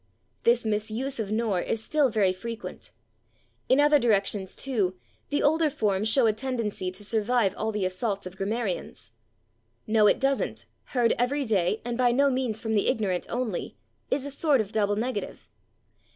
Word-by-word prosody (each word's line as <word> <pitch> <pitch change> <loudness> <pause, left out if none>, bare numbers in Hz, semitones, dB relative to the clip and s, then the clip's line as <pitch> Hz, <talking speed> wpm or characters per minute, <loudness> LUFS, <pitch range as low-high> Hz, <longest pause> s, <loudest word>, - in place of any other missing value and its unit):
This 235 0 +3
misuse 220 +5 -2
of 215 -3 -2
/nor/ 215 -4 0
is 225 -1 -2
still 295 0 +2
very 205 -4 +2
frequent. 230 +4 -7 0.8
In 260 - +5
other 295 0 +5
directions, 200 -4 0
too, 210 -9 0 0.3
the 290 - 0
older 315 +1 +3
forms 210 -4 0
show 250 +2 +4
a 220 - +4
tendency 225 -6 -3
to 185 +3 -8
survive 220 -1 +1
all 220 +1 -2
the 210 -3 -1
assaults 200 +2 -2
of 185 0 -8
grammarians. 195 - -3 0.7
"/No/ 215 -1 +4
it - - +2
/doesn't/," 265 - 0 0.2
heard 240 -2 +2
every 275 +3 +1
day 210 -2 +1
and 240 0 -3
by 245 -1 +4
no 275 +3 +3
means 255 -4 -1
from 220 -1 -2
the 205 - +2
ignorant 190 -5 0
only, 235 -6 -3 0.3
is 270 0 0
a 285 - -5
sort 285 -1 +2
of 215 -2 -2
double 205 -2 +1
negative. 225 0 -4
220 Hz, 165 wpm, -27 LUFS, 205-255 Hz, 0.8 s, In